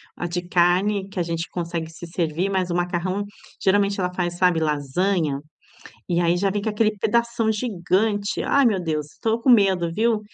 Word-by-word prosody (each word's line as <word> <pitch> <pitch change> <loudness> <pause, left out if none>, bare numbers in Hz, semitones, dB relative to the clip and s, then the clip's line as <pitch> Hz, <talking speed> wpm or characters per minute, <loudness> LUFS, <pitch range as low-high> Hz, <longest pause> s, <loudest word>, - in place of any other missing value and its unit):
ah, - - -4
de 175 +1 -2
carne 185 +3 +2
que 195 - -5
a - - +2
gente 165 0 -3
consegue 170 -2 -4
se 170 +1 -10
servir, 170 +2 -1
mas 185 -2 -1
o - - -1
macarrão 180 +3 -1 0.4
geralmente 200 +1 +2
ela 180 -1 0
faz, 175 -1 -2
sabe, 180 -2 +3
lasanha 155 +1 0 0.7
e 175 -1 +1
aí 170 0 +2
já 195 +2 +1
vem 205 +1 -2
com 220 - -1
aquele 215 0 +1
pedação 230 +1 +1
gigante, 205 -1 0
ai 280 0 +3
meu 200 -6 +1
Deus, 155 -3 -2
estou 220 +8 -1
com 255 - +3
medo, 190 -7 +4
viu, 225 +1 +2
185 Hz, 185 wpm, -23 LUFS, 170-205 Hz, 0.7 s, medo